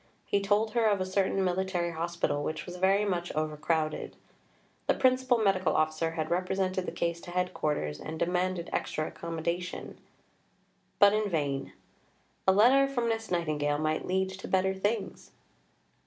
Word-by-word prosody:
He 200 - +1
told 210 +2 +2
her 230 -1 +2
of 205 -2 +2
a 185 - 0
certain 190 0 +1
military 180 -1 0
hospital 170 -2 -1
which 155 - -3
was 180 0 -7
very 195 +3 +3
much 175 -3 -1
overcrowded. 155 +1 -1 0.7
The - - +3
Principal 255 -1 +3
Medical 195 -5 +2
Officer 155 +1 +1
had 160 -1 -3
represented 185 +1 0
the - - -2
case 170 0 -2
to - - -10
Headquarters 155 - -1
and 160 +1 -6
demanded 180 +1 -1
extra 155 - -1
accommodation, 170 +2 -4 1.0
but 200 0 +7
in 215 -1 +1
vain: 140 -5 -2 0.7
"a - - +8
letter 250 +8 +5
from 240 -3 0
Miss 225 -2 -2
Nightingale 150 -4 0
might 155 +1 -1
lead 190 +1 +1
to 190 0 -8
better 190 0 +2
things." 205 +4 -3
180 Hz, 150 wpm, -29 LUFS, 160-195 Hz, 1.0 s, a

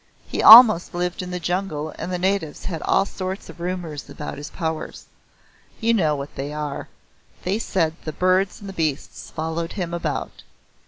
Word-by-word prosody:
He - - -2
almost 220 -7 +9
lived 180 +1 -2
in 180 - -6
the 180 0 -4
jungle 170 -3 -3
and 185 - -4
the 180 - -1
natives 185 -4 -1
had 165 -4 -4
all 195 - +2
sorts 190 0 -6
of - - -12
rumours 170 -4 -5
about 150 - -7
his 145 - -7
powers. 160 -3 -5 0.7
You 230 0 +2
know 160 -9 +2
what 140 0 -7
they 140 +2 -5
are. 150 -2 -5 0.6
They 195 +4 -1
said 165 -8 0
the 155 - -4
birds 185 +4 +1
and 195 -1 -8
beasts 155 -5 -3
followed 160 +1 -4
him 175 -4 -4
about. 170 - -4
175 Hz, 170 wpm, -22 LUFS, 155-190 Hz, 0.7 s, almost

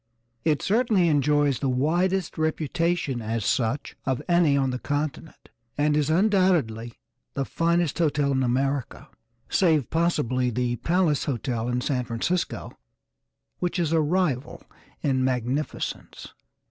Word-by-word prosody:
It 155 -3 +1
certainly 210 -5 +2
enjoys 145 -2 +2
the 135 - 0
widest 175 +8 0
reputation 160 -3 -1
as 110 -1 -2
such 120 +7 -1
of 130 -2 -1
any 170 -5 +4
on 135 -1 +1
the 125 - -3
continent, 145 +3 -4 0.3
and 150 0 +2
is 150 -1 +1
undoubtedly 165 - +2 0.4
the 135 - -1
finest 170 0 0
hotel 145 -3 +1
in 130 -1 +1
America, 130 +1 -1 0.4
save 160 -8 +2
possibly 150 -7 +1
the 120 +1 -1
Palace 170 -2 +1
Hotel, 120 -3 -2
in 125 0 0
San 125 -2 -1
Francisco, 120 +10 -2 0.9
which 180 +1 -1
is 165 -3 0
a 165 -1 +3
rival 155 -5 -1 0.4
in 130 -2 +1
magnificence. 130 +3 -3
145 Hz, 125 wpm, -25 LUFS, 125-170 Hz, 0.9 s, any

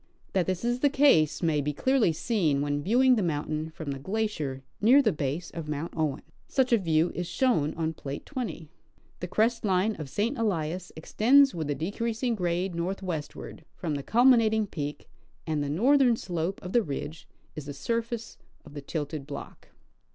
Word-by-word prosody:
That 185 -3 +1
this 185 +3 -2
is 240 +1 0
the 285 - +4
case 270 - +4
may 155 -3 +2
be 150 +1 -2
clearly 260 - +2
seen 160 -6 0
when 145 0 -1
viewing 250 - +4
the - - +1
mountain 155 -2 -2
from 155 -2 -6
the 135 - -5
glacier 155 -7 -3 0.2
near 245 +7 +7
the 235 -7 +3
base 150 +3 -3
of 160 -3 -6
Mount 150 +2 -4
Owen. 150 -3 -1 0.2
Such 255 -3 +1
a 230 - +5
view 165 -2 +2
is 175 -1 -3
shown 205 - +1
on 160 -1 -1
plate 140 -2 -7
20. 245 - -5 0.5
The 180 - -4
crest 225 +6 +1
line 200 +2 +1
of 150 -3 -6
St. 225 - -1
Elias 180 -4 -1
extends 265 - +4
with 160 -3 -4
a 145 - 0
decreasing 230 - -2
grade 180 -2 -1
northwestward 170 -3 -5
from 165 -4 -3
the 140 - -2
culminating 225 - +4
peak, 150 -6 -6 0.4
and 155 -2 -1
the 140 - -3
northern 245 - +4
slojje 175 -2 -3
of 180 - -7
the 240 - +5
ridge 155 -2 -6 0.3
is 150 -2 -7
the - - -4
sur 230 +11 0
face 230 0 -7 0.3
of 150 - -13
the 145 - -6
tilted 145 -1 -4
block. 145 - -9
175 Hz, 180 wpm, -28 LUFS, 150-230 Hz, 0.5 s, near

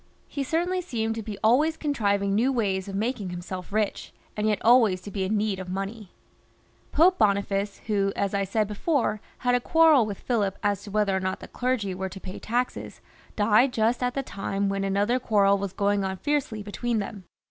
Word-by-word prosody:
He 280 - -4
certainly 345 +6 0
seemed 225 -10 -2
to 225 - -4
be 210 -1 -6
always 295 +9 +3
con 295 -2 -1
trivtag 200 -5 +1
new 230 +7 +2
Ly. 230 -6 +1 0.2
of 195 - -5
maUag 205 -4 -2
Lsm 180 +2 -7
rich, 215 0 -1 0.3
^ 210 - -1
yet 215 -2 +1
.l^y. 200 -2 +1 0.8
Pope 360 +5 +4
Boniface, 200 -1 +1
who, 200 -2 +1
as 200 0 -1
I 200 0 +1
said 210 +2 0
before, 215 0 0 0.2
had 245 -1 +1
a 245 - +4
quarrel 310 -3 +5
with 200 -2 -5
Philip 205 -6 -1
as 205 -2 +1
to - - -8
whether 205 -1 +1
or - - +1
not 185 0 -2
the - - -10
clergy 245 -6 -1
were 190 +1 -4
to 195 - -9
pay 185 0 -8
taxes, 245 +3 -3 0.4
died 220 +5 +4
just 230 +2 +1
at 250 0 -1
the 275 - -1
time 200 -2 -2
when 195 0 -1
another 200 +6 +1
quarrel 200 -4 +3
was 200 -1 -3
going 200 +1 +1
on 190 0 -3
fiercely 270 -5 -1
between 230 +3 -2
them. 200 -2 -5
210 Hz, 185 wpm, -26 LUFS, 195-245 Hz, 0.8 s, quarrel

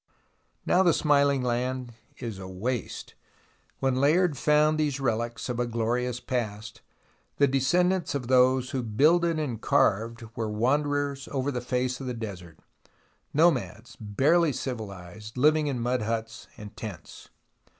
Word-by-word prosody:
Now 180 - +4
the 175 -4 +4
smiling 140 -3 +3
land 125 0 -2 0.2
is 115 -6 -6
a 95 - -7
waste. 110 +7 -4 0.6
When 135 -1 0
Layard 160 +2 +3
found 150 +3 +3
these 145 -3 0
relics 120 -2 -2
of 125 -2 -3
a 120 - 0
glorious 120 +2 -1
past, 110 -4 -4 0.6
the 140 - +5
descendants 175 +7 +1
of 135 -3 -3
those 130 0 +3
who 130 - -1
builded 155 +9 +3
and 130 -8 -3
carved 115 +4 +1
were 110 -2 -2
wanderers 140 +5 0
over 140 0 -1
the 125 -2 -3
face 125 +1 -2
of 130 - -5
the 125 - -3
desert, 90 -8 -8 0.7
nomads, 130 -7 +1
barely 145 +10 +2
civilized, 105 -4 -7
living 150 +3 +3
in 135 -4 -2
mud 125 +1 0
huts 115 +1 -4
and 105 -1 -10
tents 100 -7 -9
125 Hz, 140 wpm, -27 LUFS, 115-145 Hz, 0.7 s, the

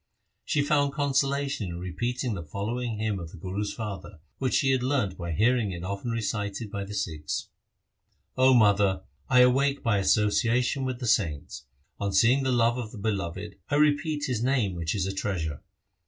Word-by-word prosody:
She 145 - +1
found 145 -2 +2
consolation 140 -4 0
in 85 -1 -5
repeating 120 +7 -2
the 95 - -4
following 110 +8 -3
hymn 105 -2 -1
of 85 -2 -7
the - - -12
Guru's 95 +4 -3
father, 105 -5 -6 0.2
which 130 -2 0
she 135 - +3
had 130 -1 +2
learned 125 -8 0
by 85 -1 -5
hearing 110 +4 +2
it 85 -1 -6
often 100 +5 -4
recited 105 -1 -3
by 100 -2 -4
the 105 +1 -7
Sikhs: 80 -7 -3 0.4
— - - -47
0 130 0 +5
mother, 100 -4 +4 0.3
I 125 -1 +6
awake 135 +3 +3
by 115 -4 +2
association 115 +6 +2
with 130 -1 -2
the 125 - -4
saints; 80 - 0 0.3
On 100 -1 -1
seeing 115 +8 +4
the 130 -1 0
love 120 0 +2
of 110 -3 -5
the - - -10
Beloved, 100 -1 -3
I - - +1
repeat 150 0 +2
His 120 -3 -1
name 125 -7 +1
which 85 0 -2
is 95 -2 0
a 95 - -2
treasure. 85 -7 -3
110 Hz, 185 wpm, -27 LUFS, 95-130 Hz, 0.4 s, I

